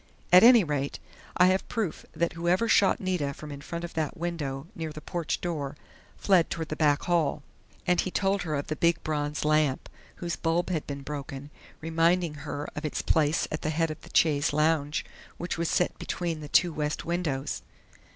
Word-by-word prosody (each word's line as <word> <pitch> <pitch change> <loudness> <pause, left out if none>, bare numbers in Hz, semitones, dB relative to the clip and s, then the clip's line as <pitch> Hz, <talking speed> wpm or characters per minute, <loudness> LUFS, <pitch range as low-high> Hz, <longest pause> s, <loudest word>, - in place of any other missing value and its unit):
At 180 - +10
any 235 -2 +8
rate, 145 -3 -2 0.4
I 180 - +7
have 190 +1 +1
proof 220 -8 -3
that 170 0 0
whoever 175 +6 +1
shot 200 -3 +4
Nita 180 -7 -1
from 150 -1 -9
in 140 -1 -7
front 170 +3 -5
of 170 - -6
that 160 +2 -2
window 155 -5 -3
near 160 -5 -5
the 155 - -8
porch 160 -3 -3
door 150 -5 -3 0.4
fled 185 -4 +3
toward 160 -1 -4
the 155 - -2
back 150 -2 +2
hall." 165 -5 +1 0.4
And 180 -1 +3
he - - -3
told 195 +1 +1
her 155 -3 -2
of 140 - -2
the 155 - -3
big 170 +1 +2
bronze 150 -1 -2
lamp, 150 -3 +2 0.3
whose 170 -1 -3
bulb 170 +2 0
had 160 -4 -2
been 140 -1 -5
broken, 140 0 -6 0.3
reminding 165 +1 +2 0.2
her 145 +1 -4
of 150 - -5
its 155 - -2
place 155 0 +2
at 155 - -3
the 155 - -1
head 160 +1 0
of 155 - -8
the - - -13
chaise 145 -3 +3
longue 150 -1 +2 0.4
which 175 -1 -4
was 170 - 0
set 180 - +1
between 170 -3 -3
the 150 -1 -8
two 175 +1 +4
west 150 0 -2
windows. 160 -5 -2
160 Hz, 195 wpm, -28 LUFS, 150-175 Hz, 0.4 s, At